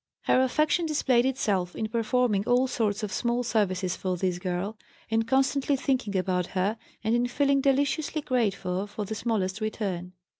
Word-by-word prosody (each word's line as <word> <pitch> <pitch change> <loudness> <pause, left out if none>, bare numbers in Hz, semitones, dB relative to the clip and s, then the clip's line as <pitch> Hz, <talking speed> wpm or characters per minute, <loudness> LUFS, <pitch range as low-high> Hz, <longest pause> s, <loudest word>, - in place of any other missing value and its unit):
Her 255 - +4
affection 305 +5 +2
displayed 260 -5 +2
itself 195 -9 0
in 220 - -2
performing 230 -2 +1
all 245 +1 +4
sorts 220 -4 -1
of 210 - -3
small 240 0 0
services 195 -5 0
for 185 -1 -2
this 180 -1 -1
girl, 185 +4 -3 0.3
in 225 0 +2
constantly 270 +4 +2
thinking 255 -7 0
about 185 -1 0
her, 205 +5 0 0.2
and 220 +1 +1
in 240 +1 +2
feeling 275 +2 +2
deliciously 285 +3 +1
grateful 200 -7 0
for 210 0 -5
the 220 - -4
smallest 215 -3 -1
return. 190 -5 -3
225 Hz, 160 wpm, -27 LUFS, 190-260 Hz, 0.3 s, Her